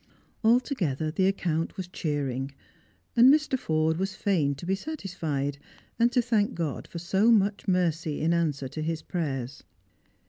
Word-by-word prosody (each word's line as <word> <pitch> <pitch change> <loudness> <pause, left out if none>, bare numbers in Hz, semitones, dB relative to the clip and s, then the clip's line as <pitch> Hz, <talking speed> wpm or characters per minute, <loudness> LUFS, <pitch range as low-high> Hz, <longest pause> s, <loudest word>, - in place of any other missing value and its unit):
Alto 245 +5 +3
gelher, 155 - -1
the 190 +2 +2
account 170 -2 -1
was 185 -2 -4
cheering, 140 -6 -2 0.6
and 245 +3 +8
Mr. 300 -2 +3
Forde 160 -2 +1
was 190 0 -2
fain 160 -9 +1
to 145 - -9
be 190 - +1
satisfied, 165 - -3 0.4
and 235 +1 +4
to 245 0 +2
thank 220 -3 +1
God 165 -5 -3
for - - -8
so 190 +6 +2
much 205 -1 +2
mercy 165 -4 0
in 165 +2 +2
answer 150 -5 0
to 155 +4 -6
hia 165 +1 -1
prayers. 135 -7 -3
170 Hz, 160 wpm, -27 LUFS, 150-200 Hz, 0.6 s, and